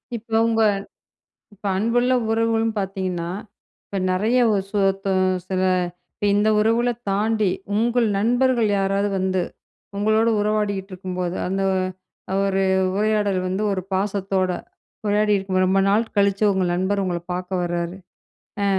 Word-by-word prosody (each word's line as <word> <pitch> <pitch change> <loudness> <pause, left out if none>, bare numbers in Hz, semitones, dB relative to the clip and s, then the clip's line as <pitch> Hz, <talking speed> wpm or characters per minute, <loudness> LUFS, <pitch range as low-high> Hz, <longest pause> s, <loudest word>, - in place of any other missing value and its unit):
இப்போ 225 0 -4
உங்க 225 -1 +1 0.9
இப்ப 205 - -9
அன்புள்ள 240 +5 +2 0.2
உறவுகளும் 225 0 +1
பார்த்தீங்கன்னா, 185 -3 -3 0.5
இப்ப 200 - -7
நிறைய 215 +7 +2
ஒரு 200 -2 +1
சோத்தோம் 195 -2 +1 0.2
சில 185 -1 0 0.5
இப்ப - - -6
இந்த 205 +1 +3
உறவுகள 230 +3 +2 0.2
தாண்டி, 215 +1 +1 0.3
உங்கள் 235 +2 +2
நண்பர்கள் 240 +1 +2
யாராவது 195 +1 +1
வந்து 190 0 0 0.6
உங்களோட 215 +2 +2
உறவாடிக்கிட்டு 205 -2 -1
இருக்கும்போது, 180 -1 -4
அந்த 195 +2 -1 0.8
ஒரு 195 -1 +1 0.3
உரையாடல் 205 -2 +1
வந்து 190 +3 -2
ஒரு 185 -1 -2
பாசத்தோட 195 -1 0 0.6
உரையாடியிருக்கும். 205 -2 +2
ரொம்ப 190 +1 +2
நாள் 210 +3 +3
கழிச்சு 200 +1 +2
உங்கள் 185 -2 0
நண்பர் 190 +3 0
உங்கள 175 -2 -2
பார்க்க 180 0 -2
வராரு. 175 +1 -3 0.7
அ - - +2
200 Hz, 120 wpm, -22 LUFS, 190-215 Hz, 0.9 s, இந்த